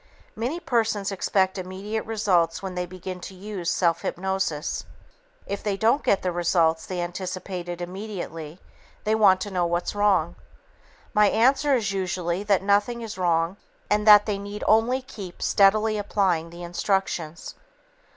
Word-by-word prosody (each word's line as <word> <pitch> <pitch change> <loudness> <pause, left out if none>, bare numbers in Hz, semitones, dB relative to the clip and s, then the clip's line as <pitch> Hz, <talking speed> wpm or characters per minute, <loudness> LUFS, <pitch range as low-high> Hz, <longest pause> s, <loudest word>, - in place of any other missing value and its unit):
Many 250 +10 -2
persons 225 - 0
expect 190 0 +1
immediate 195 +4 -4
results 190 -7 +1
when 190 -1 -4
they 180 0 -3
begin 185 +1 -7
to 190 - -8
use 190 -2 -4
self 170 -1 +1
hypnosis. 190 -4 -2 0.6
If 200 - -4
they 205 -2 -1
don't 230 +7 +3
get 195 - +1
the 180 - 0
results 170 -2 +1
they 185 -1 -4
anticipated 180 0 -5
immediately, 175 -4 -7 0.4
they 215 - +1
want 200 -4 +5
to 205 - -4
know 180 -2 +1
"what's 175 +1 -1
wrong?" 195 -5 +2 0.8
My 210 0 +5
answer 270 +6 +3
is 215 -5 0
usually 185 -2 -2
that 200 -2 +1
"nothing 205 +4 +2
is 220 -4 -7
wrong" 170 +1 +1 0.3
and 210 +1 +2
that 210 -1 +9
they 205 -2 -2
need 205 +1 -6
only 240 +4 +3
keep 195 -8 -9
steadily 215 +2 +3
applying 185 -5 0
the 170 +1 -10
instructions. 175 -2 -2
195 Hz, 150 wpm, -25 LUFS, 175-210 Hz, 0.8 s, that